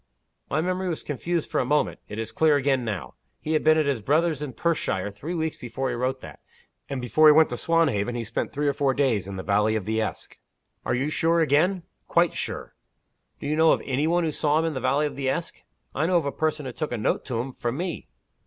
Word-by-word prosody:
"My 155 +4 +1
memory 185 +2 -1
was 165 - -4
confused 165 +3 -2
for - - +1
a - - +2
moment. 150 0 +1
It 105 - -6
is 115 0 -4
clear 155 +5 +3
again 135 -2 +1
now. 105 -6 -4 0.3
He 155 - -3
had 155 - +1
been 155 0 +5
at 155 - +2
his 140 -5 0
brother's 155 +5 +1
in 145 -4 -4
Perthshire 110 - -1
three 145 - -6
weeks 160 -1 -2
before 130 +2 -3
he 120 - -2
wrote 130 +2 -2
that. - - -11 0.5
And 135 -2 -3
before 125 +6 +4
he - - +10
went 160 +1 +5
to - - -1
Swanhaven, 130 -8 +1
he 120 - -2
spent 115 +1 -3
three 145 +1 -1
or 140 - +2
four 135 -1 +1
days 120 -9 +1
in 100 - -6
the 95 - -5
valley 105 +2 +2
of 105 -4 -2
the 110 +1 0
Esk." 110 - -5 0.5
"Are - - +1
you 135 +4 0
sure 165 +2 +2
again?" 165 +4 +2 0.2
"Quite 170 -1 +3
sure!" - - -5 0.7
"Do - - -8
you 150 +2 0
know 160 0 +5
of - - -1
any 140 +3 0
one 175 +1 +2
who 160 - 0
saw 150 0 +1
him 165 - +1
in 165 - -1
the 130 - -3
valley 135 +4 +2
of 145 - -4
the 135 -1 -1
Esk?" 170 +5 -3 0.3
"I 155 +3 0
know 180 0 +3
of 165 - 0
a 140 - -1
person 155 -1 -1
who 130 - -4
took 155 +5 -4
a 120 - -1
note 105 - 0
to 120 -4 -2
him, 130 +2 -4
from 120 +2 -3
me." 175 0 -4
145 Hz, 255 wpm, -25 LUFS, 120-160 Hz, 0.7 s, he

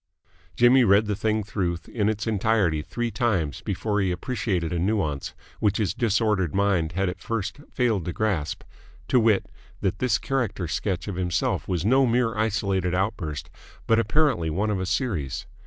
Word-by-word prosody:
Jimmy 125 +2 +6
read 100 0 +5
the 105 -1 -1
thing 110 +1 0
through 95 -4 -2
in 105 -3 0
its 105 -1 -2
entirety 105 -7 +1
three 120 +8 -3
times 95 - 0
before 105 -2 -1
he 95 -2 +1
appreciated 90 -3 -2
a 85 - 0
nuance 90 -7 -1 0.2
which 105 -1 +2
his 105 -4 0
disordered 105 -6 +1
mind 95 -5 +1
had 95 +2 0
at 90 +1 -4
first 110 +1 -3
failed 110 -9 +1
to 90 - -2
grasp 95 -7 -1 0.5
to 125 - +5
wit, 110 -4 +3 0.4
that 95 0 -1
this 125 -2 +2
character 120 -10 -2
sketch 90 +3 -2
of 100 -3 -4
himself 90 -2 -1
was 90 -1 -1
no 130 +4 +4
mere 115 -1 +1
isolated 100 -4 0
outburst 90 -6 -2 0.3
but 115 0 +3
apparently 115 - +2
one 100 +7 0
of 100 - -1
a 95 - -2
series. 80 - -2
100 Hz, 170 wpm, -25 LUFS, 90-115 Hz, 0.5 s, Jimmy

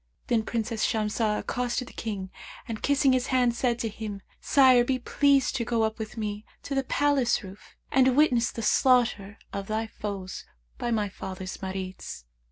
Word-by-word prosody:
Then 235 -2 +2
Princess 225 0 -2
Shamsah 215 0 +1
accosted 250 0 -2
the - - -12
King 195 -4 -5 0.4
and 225 -2 -5
kissing 280 -1 +3
his 255 -1 +1
hand, 250 -2 +3
said 240 0 0
to 235 - -2
him, 210 -2 -6 0.2
'Sire, 260 -3 +5
be 260 +1 0
pleased 275 +2 +2
to 235 - -1
go 230 -1 0
up 220 0 -1
with 220 +1 -6
me 210 -1 -3 0.2
to 280 - -4
the 270 0 +1
palace 275 -3 +2
roof 190 +1 -12 0.2
and 260 0 +4
witness 245 -6 +4
the 230 - -5
slaughter 230 -5 +3 0.2
of 200 -1 -4
thy 220 +1 -1
foes 200 -4 -6 0.4
by 240 - -2
my 215 -3 +1
father's 190 -1 -6
Marids.' 190 - -6
230 Hz, 175 wpm, -27 LUFS, 210-255 Hz, 0.4 s, Sire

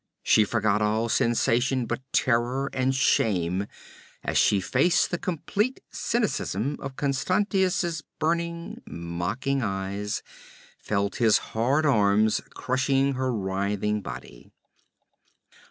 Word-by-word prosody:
She 110 - +5
forgot 105 -1 +1
all 110 +2 +1
sensations 120 +1 +2
but - - -3
terror 125 +3 +1
and 130 +1 +1
shame 95 -7 +1 0.6
as - - -2
she 100 - +4
faced 135 - +2
the 175 - -1
complete 205 - -1
cynicism 145 - -1
of 135 -1 -7
Constantius's 180 +4 0 0.2
burning, 170 +1 -2
mocking 90 +11 -2
eyes, 100 0 -3 0.6
felt 100 -1 -1
his 115 -3 +5 0.2
hard 130 +8 +2
arms 105 -4 +3
crushing 135 +1 +1
her 130 0 -1
writhing 100 0 -1
body. - - -9
120 Hz, 105 wpm, -26 LUFS, 105-140 Hz, 0.6 s, She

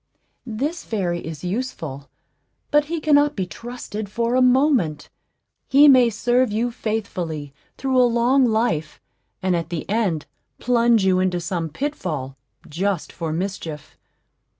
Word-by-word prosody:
This 275 +10 -3
fairy 180 -6 -2
is 160 -2 -8
useful; 175 - -4 0.6
but 295 0 +4
he 330 +2 -3
cannot 295 -1 +3
be 190 - -1
trusted 215 +2 -7
for 235 +3 -1
a 255 - +3
moment; 250 - +2 0.6
he 280 +2 +7
may 255 -4 +7
serve 240 +2 +1
you 235 +3 0
faithfully 180 -11 -4 0.2
through 260 -1 +2
a 245 - +4
long 240 +3 +3
life, 220 -10 0 0.4
and 185 -1 +2
at 165 -1 -3
the 165 -3 -4
end 195 -7 0 0.3
plunge 235 -3 +3
you 185 -1 +3
into 185 -1 +1
some 170 -1 -3
pitfall, 155 - -4 0.3
just 185 +2 -2
for 165 -2 -4
mischief. 165 -3 -5
215 Hz, 135 wpm, -22 LUFS, 170-250 Hz, 0.6 s, he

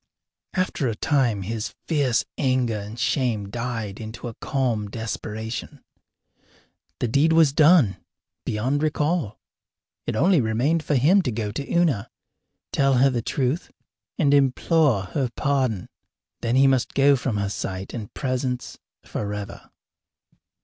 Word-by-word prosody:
After 185 -7 0
a 115 - -1
time 120 -7 +1
his 110 +2 -4
fierce 140 -7 +1
anger 130 -5 +1
and 105 +3 -8
shame 115 -8 0
died 115 -4 -4
into 110 +2 -7
a 115 - -6
calm 115 -5 -1
desperation. 110 +1 -5 1.2
The 125 - 0
deed 140 +7 +3
was 160 -4 +5
done 150 - +5 0.5
beyond 130 +7 -1
recall. 155 - 0 0.7
It - - -1
only 175 - +4
remained 125 +9 +1
for 150 - 0
him 165 +10 +5
to 130 - -2
go 105 -2 -3
to 140 +6 -5
Una, 160 - +1 0.6
tell 135 -1 +3
her 135 +2 +4
the 120 -2 -1
truth, 135 +6 -1 0.5
and 145 -3 +3
implore 140 - +3
her 125 +8 -2
pardon. 130 -9 0 0.5
Then 115 +1 0
he 135 +1 +6
must 130 -2 +2
go 140 +1 +5
from 125 -4 -2
her 100 -1 -1
sight 95 -1 -5
and 110 -4 -6
presence 130 -2 -3 0.2
forever. 105 -1 -5
125 Hz, 135 wpm, -24 LUFS, 110-140 Hz, 1.2 s, he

